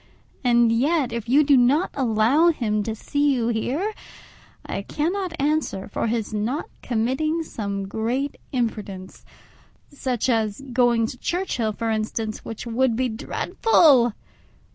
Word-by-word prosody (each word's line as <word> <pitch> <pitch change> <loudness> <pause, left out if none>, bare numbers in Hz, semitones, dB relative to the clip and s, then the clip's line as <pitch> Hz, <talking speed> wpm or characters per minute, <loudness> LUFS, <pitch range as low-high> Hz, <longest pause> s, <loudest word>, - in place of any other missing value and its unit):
And 240 -2 +4
yet, 265 +2 +1
if 235 -1 -4
you 285 +4 +5
do 285 -1 +5
not 265 +8 +3
allow 255 +5 +3
him 215 -9 0
to 220 +1 -3
see 285 +4 +1
you 235 -2 0
here, 275 - -1 0.7
I - - -3
cannot 350 +2 -2
answer 290 -9 0
for 210 - -2
his 225 -2 -2
not 225 +8 -1 0.2
committing 265 +8 0
some 200 -8 -4
great 240 +7 -2
imprudence—such 230 +3 -5
as 220 -4 0
going 240 -2 +3
to 245 +2 -7
Churchhill, 265 - -1
for 225 +1 -2
instance, 215 0 -3
which 225 +1 -7
would 235 +1 +1
be 255 +1 0
dreadful! 245 - +3
240 Hz, 130 wpm, -23 LUFS, 220-285 Hz, 0.7 s, you